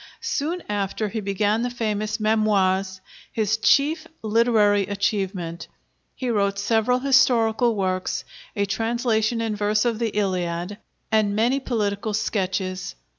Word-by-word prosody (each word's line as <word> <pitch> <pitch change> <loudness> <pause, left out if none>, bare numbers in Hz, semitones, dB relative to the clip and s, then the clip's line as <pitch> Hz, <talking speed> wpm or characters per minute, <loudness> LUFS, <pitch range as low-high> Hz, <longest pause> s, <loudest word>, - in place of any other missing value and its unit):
Soon 350 -6 -2
after, 205 +1 -2
he 220 - -3
began 205 +2 0
the 245 - -1
famous 215 -2 -2
'Memoires,' 195 -3 +1 0.3
his 220 -1 0
chief 305 +7 +2 0.2
literary 215 -3 +3
achievement. 195 -4 -2 0.5
He 255 -2 -2
wrote 200 -2 +1
several 225 +4 +2
historical 245 -3 +3
works, 185 -2 -1 0.3
a 200 - +1
translation 225 +1 0
in 225 -2 -1
verse 210 +2 +1
of 230 -2 0
the 230 -1 0
Iliad, 180 0 -2 0.3
and 215 -2 +2
many 240 +5 +2
political 210 -4 -2
sketches. 190 - -2
215 Hz, 125 wpm, -23 LUFS, 200-230 Hz, 0.5 s, literary